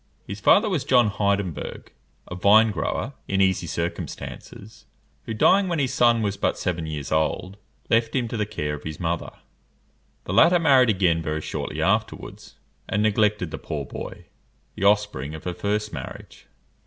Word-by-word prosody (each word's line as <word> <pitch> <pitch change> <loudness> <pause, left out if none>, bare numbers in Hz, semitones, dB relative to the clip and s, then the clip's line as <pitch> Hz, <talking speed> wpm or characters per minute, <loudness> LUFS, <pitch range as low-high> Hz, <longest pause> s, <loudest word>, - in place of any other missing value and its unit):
His 100 +1 -7
father 210 - +5
was 180 -10 -1
John 120 -4 +4
Heidenberg, 100 -4 -2 0.4
a - - -7
vine 105 +5 +5
grower, 105 - -3
in 95 - 0
easy 95 -2 +2
circumstances, 85 +5 -6 0.4
who, 115 - -3
dying 190 - +4
when 170 -2 -1
his 135 -3 0
son 120 -3 +3
was 100 -1 -1
but - - 0
seven 85 -3 -2
years 75 -3 -5
old, 80 +4 0 0.3
left 115 +2 +1
him 125 -3 0
to - - -4
the 105 -2 -1
care 75 -7 -3
of 75 - -6
his 80 -1 -6
mother. 85 0 -2 0.9
The - - -5
latter 175 +2 +6
married 135 -7 +5
again 90 -5 +2
very 80 -1 -3
shortly - - -4
afterwards, - - -2 0.3
and 105 - +1
neglected 105 -4 +1
the - - -6
poor 75 -2 -5
boy, - - -8 0.5
the 100 - -3
offspring 100 -9 +1
of 80 - -10
her 90 - -3
first 105 +3 -2
marriage. - - -9
100 Hz, 165 wpm, -24 LUFS, 85-115 Hz, 0.9 s, latter